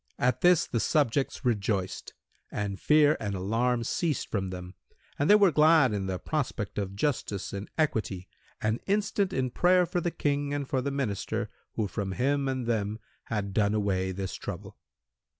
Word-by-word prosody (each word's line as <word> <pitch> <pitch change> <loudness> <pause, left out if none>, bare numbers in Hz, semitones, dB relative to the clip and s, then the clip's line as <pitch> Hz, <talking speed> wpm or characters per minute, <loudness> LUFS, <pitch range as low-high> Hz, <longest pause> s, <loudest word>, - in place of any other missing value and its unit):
At 125 +1 +1
this 175 -2 +5
the 115 - -2
subjects 140 0 +1
rejoiced 100 -5 -1 0.4
and 100 -1 -3
fear 150 0 +5
and 100 -2 -3
alarm 115 +6 0
ceased 155 +3 -1
from 95 -3 -1
them 90 0 -7 0.5
and 145 - +2
they 210 - +9
were 200 -4 +5
glad 150 -4 +5
in 100 -2 -2
the 95 -1 -2
prospect 120 - -3
of 100 -1 -4
justice 105 -5 -2
and 100 +1 -5
equity 105 - -1 0.3
and 110 +2 0
instant 200 -1 +1
in 130 -5 -1
prayer 180 +5 +4
for 175 +1 -2
the 175 - 0
King 145 -2 -1
and 140 -2 -3
for 130 -1 0
the 140 - -2
Minister 115 -4 -2 0.2
who 110 -2 -1
from 100 -1 -3
him 140 +4 +1
and 130 -2 -2
them 110 -2 -1 0.3
had 100 -3 -3
done 105 0 +2
away 95 -3 0
this 95 0 -4
trouble. - - -7
115 Hz, 170 wpm, -28 LUFS, 100-145 Hz, 0.5 s, they